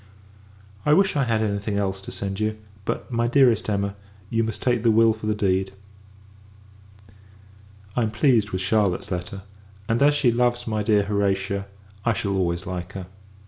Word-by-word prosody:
I 150 - +4
wish, 195 +1 +3
I 140 -2 +2
had 110 -2 +1
any 100 -1 0
thing 100 0 -3
else 95 -1 -1
to - - -8
send 100 0 -4
you; 110 0 -1 0.3
but, - - -3
my 120 0 +1
dearest 125 -4 +3
Emma, 100 -1 -1 0.4
you 115 0 +2
must 110 -1 -4
take 120 -2 +2
the 115 - +3
will 115 0 +5
for 110 -1 -7
the 105 - +1
deed. 95 -1 0 2.2
I 125 - +2
am 110 - +1
pleased 110 -1 +2
with 95 -2 -3
Charlotte's 100 -1 +1
letter; 90 +2 -4 0.4
and, 115 +2 +1
as 145 +1 +5
she 140 -5 +3
loves 120 0 +1
my 110 -1 -1
dear 105 -1 +3
Horatia, 100 -1 -1 0.4
I 115 - +2
shall 100 -2 -2
always 85 -2 -1
like 90 +1 -5
her. 95 -2 -6
105 Hz, 180 wpm, -24 LUFS, 100-115 Hz, 2.2 s, will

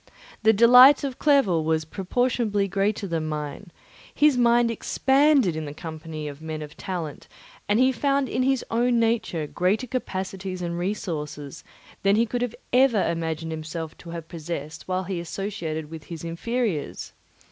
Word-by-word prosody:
The 220 - +6
delight 250 +6 +8
of 270 -3 -4
Clerval 245 - +3
was 160 0 0
proportionably 205 +3 0
greater 200 +2 0
than 165 -4 -2
mine; 150 +4 -5 0.4
his 300 -2 +4
mind 240 -1 +4
expanded 265 - +3
in 160 -1 -4
the 145 0 -7
company 155 -1 -7
of 145 +1 -8
men 155 -1 -5
of 150 +1 -11
talent, 170 -6 -5 0.4
and 205 - +3
he 260 +2 +4
found 275 +2 +1
in 250 - -1
his 265 0 +1
own 240 +1 +2
nature 225 -8 0
greater 185 - 0
capacities 190 -6 -4
and 170 0 -3
resources 155 -7 -4 0.4
than 195 +1 +3
he 230 +2 +3
could 240 +2 -3
have 245 -2 -2 0.2
imagined 170 - +1
himself 160 0 -5
to 170 - -11
have 165 -1 -7
possessed 160 -2 -6
while 185 0 -1
he 185 -1 -3
associated 170 -4 -4
with 160 -2 -9
his 165 -2 -8
inferiors. 175 - -3
185 Hz, 155 wpm, -25 LUFS, 160-235 Hz, 0.4 s, delight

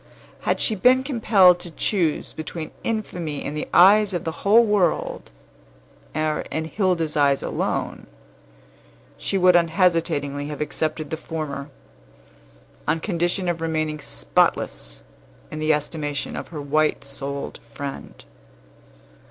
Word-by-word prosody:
Had - - +2
she 225 - +1
been 250 +6 +4
compelled 210 -9 +5
to 175 - -7
choose 165 -1 -1
between 155 0 -6
infamy 175 -9 -3
in 145 - -3
the 150 - -4
eyes 200 +2 +6
of 175 - -2
the 160 - -2
whole 225 +4 +6
world, 200 -6 0 0.9
or 155 -1 0
in 160 0 -2
Hilda's 170 -3 0
eyes 140 -2 +3
alone, - - -3 1.1
she 195 - -1
would 180 -1 +5
unhesitatingly 165 -4 +1
have 150 -1 -6
accepted 155 0 -2
the 160 - -2
former, 150 -3 -5 1.2
on 165 - +1
condition 175 +1 -1
of 170 -2 -1
remaining 155 -2 -1
spotless - - -1 0.5
in 155 - -5
the 155 0 +2
estimation 150 -1 -2
of - - -5
her 160 - -7
white 155 +2 +1
souled 140 0 -5
friend. 140 +3 -7
160 Hz, 125 wpm, -23 LUFS, 150-180 Hz, 1.2 s, eyes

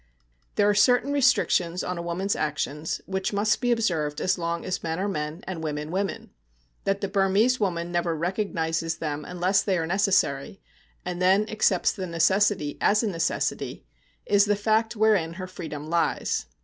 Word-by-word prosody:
There 205 - +3
are 205 - +4
certain 245 +6 +3
restrictions 210 -10 +2
on 180 -1 -3
a - - -3
woman's 175 +4 -1
actions 150 0 -2
which 190 +1 -2
must 210 +3 +1
be 245 -1 +1
observed 165 -10 0
as 185 -1 0
long 170 0 -2
as 185 - -2
men 160 0 -3
are 195 - -1
men 155 -2 -4
and 180 -4 -5
women 150 0 -4
women. 195 +2 -3 0.5
That 195 0 0
the 200 - -1
Burmese 200 +5 +2
woman 175 -4 -1
never 175 -1 0
recognises 165 -2 -1
them 150 -2 -3
unless 180 +3 +1
they 190 -3 0
are 165 - -1
necessary, 190 -4 +1 0.5
and 180 0 -4
then 195 +3 +4
accepts 205 -4 +2
the 190 -1 -5
necessity 170 -1 +1
as 210 +3 +3
a - - +1
necessity, 165 -4 -2 0.4
is 205 0 +4
the 205 0 +2
fact 220 +2 +1
wherein 205 -7 +2
her 185 +2 -6
freedom 155 -5 -7
lies. 165 - 0
185 Hz, 170 wpm, -26 LUFS, 165-205 Hz, 0.5 s, are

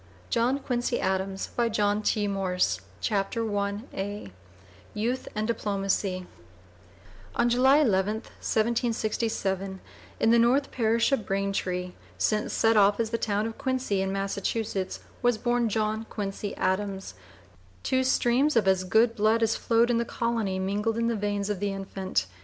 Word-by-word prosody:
JOHN 240 +4 +2
QUINCY 245 -1 -1
ADAMS 190 0 -2
(p. 210 -2 +1
001) 195 -2 -2 0.4
CHAPTER 210 +1 -1
I 200 - -4 0.6
YOUTH 240 +5 -1
AND 215 0 -1
DIPLOMACY 195 -4 -1 1.1
On 240 - +3
July 255 +4 +5
11, 210 -7 +2
1767, 220 -4 -1 0.4
in 225 - +4
the 235 - +6
North 255 +4 +3
Parish 230 +1 +2
of 265 -7 0
Braintree, 195 -2 -1 0.3
since 215 -1 0
set 225 0 +3
off 205 0 +5
as 225 -1 0
the 230 - -1
town 210 0 0
of 225 0 -6
Quincy, 260 -7 0
in 190 0 -1
Massachusetts, 195 0 -2 0.2
was 245 -2 +3
born 240 0 +1
John 215 +1 -1
Quincy 200 -1 -4
Adams. 190 - -1 0.7
Two 260 0 +1
streams 260 +3 +2
of 215 -4 +3
as 190 -1 +3
good 225 +5 +3
blood 220 +2 +3
as 225 0 +2
flowed 235 +1 +2
in 235 - +2
the - - +1
colony 230 -5 -1
mingled 205 +4 -1
in 230 0 +1
the 230 - 0
veins 205 -1 -1
of 200 - -3
the 205 0 -1
infant. 190 - -2
215 Hz, 140 wpm, -27 LUFS, 195-235 Hz, 1.1 s, the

